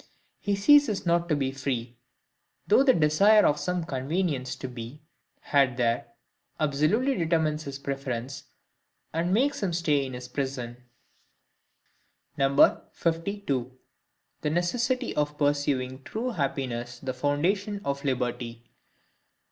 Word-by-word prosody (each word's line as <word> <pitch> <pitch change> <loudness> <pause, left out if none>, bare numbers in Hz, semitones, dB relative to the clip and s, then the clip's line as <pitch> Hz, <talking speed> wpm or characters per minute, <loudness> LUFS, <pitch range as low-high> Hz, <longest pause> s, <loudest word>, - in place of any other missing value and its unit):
He 205 -1 0
ceases 220 0 +4
not 170 0 +1
to 155 - +3
be 135 -2 -1
free; 130 -3 -3 0.7
though - - +5
the 275 -1 +6
desire 195 +8 +5
of 145 - +3
some 180 -1 -1
convenience 140 -2 -2
to 130 - -6
be 125 +4 -9 0.4
had 135 -4 +2
there 120 -1 0 0.5
absolutely 155 - +2
determines 160 -5 0
his 140 -1 -5
preference, 135 0 -4 0.7
and 170 +3 0
makes 265 +8 +2
him 190 -4 -1
stay 150 -4 +1
in 130 - -8
his 125 0 -7
prison. 125 -2 -4 1.6
52. 140 0 +1 0.6
The 150 - 0
Necessity 240 - 0
of 150 0 -1
pursuing 145 -3 0
true 230 - -3
Happiness 125 - -3
the 130 +1 -4
Foundation 180 - 0
of 140 0 -2
Liberty. 120 -3 -3
145 Hz, 115 wpm, -27 LUFS, 130-175 Hz, 1.6 s, the